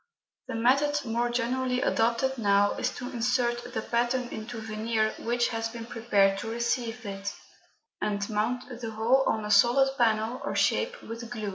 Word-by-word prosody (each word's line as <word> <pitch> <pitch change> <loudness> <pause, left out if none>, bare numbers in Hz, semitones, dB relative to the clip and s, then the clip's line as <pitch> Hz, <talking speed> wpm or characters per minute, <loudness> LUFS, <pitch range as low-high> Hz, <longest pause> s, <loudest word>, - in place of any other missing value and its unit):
The - - -4
method 275 +5 +2
more 235 +1 0
generally 250 +1 0
adopted 235 +3 +1
now 205 -1 +3
is - - -1
to 250 - -6
insert 240 0 0
the 220 -2 -3
pattern 240 +1 0
into 225 +1 -6
veneer 220 0 -1
which 240 +1 0
has 225 -1 -2
been 230 0 -7
prepared 205 -5 +2
to 225 - -5
receive 235 0 -2
it, 195 0 -5 0.7
and 205 -1 -1
mount 225 +4 -1 0.2
the 225 - -3
whole 225 +5 +3
on 220 -1 0
a 210 - -3
solid 255 +6 +5
panel 225 +1 +1
or - - -3
shape - - +1
with 230 +1 -7
glue. 215 -4 -4
235 Hz, 165 wpm, -28 LUFS, 220-245 Hz, 0.7 s, solid